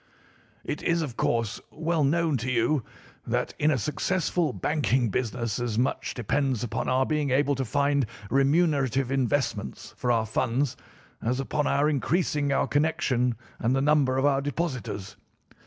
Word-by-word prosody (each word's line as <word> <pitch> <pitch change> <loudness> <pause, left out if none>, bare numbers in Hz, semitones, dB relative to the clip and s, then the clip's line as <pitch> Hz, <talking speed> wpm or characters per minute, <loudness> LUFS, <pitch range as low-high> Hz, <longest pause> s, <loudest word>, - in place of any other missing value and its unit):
"It 145 - -4
is, 170 -1 +1
of 130 -6 -5
course, 115 -2 0
well 160 -1 0
known 160 +2 +2
to 125 +2 -3
you 125 +3 +2 0.4
that - - -1
in 150 - +3
a 145 - +2
successful 165 - 0
banking 130 -4 +1
business 115 +1 -2
as 120 -3 -2
much 125 +3 -1
depends 130 +1 0
upon 115 - -2
our 130 +1 +3
being 150 -1 0
able 140 +2 +2
to 135 -1 -1
find 140 +1 +1 0.2
remunerative 135 -3 +2
investments 130 - -1
for 125 - 0
our 115 -2 +2
funds 120 +4 0 0.5
as 125 +3 0
upon 145 +2 -1
our 140 +2 +2
increasing 150 0 +1
our 140 - +2
connection 145 -6 +1 0.2
and 120 +3 +1
the - - +2
number 140 -3 +3
of 135 - +2
our 140 -1 +3
depositors. 135 - -4
135 Hz, 155 wpm, -27 LUFS, 120-150 Hz, 0.5 s, in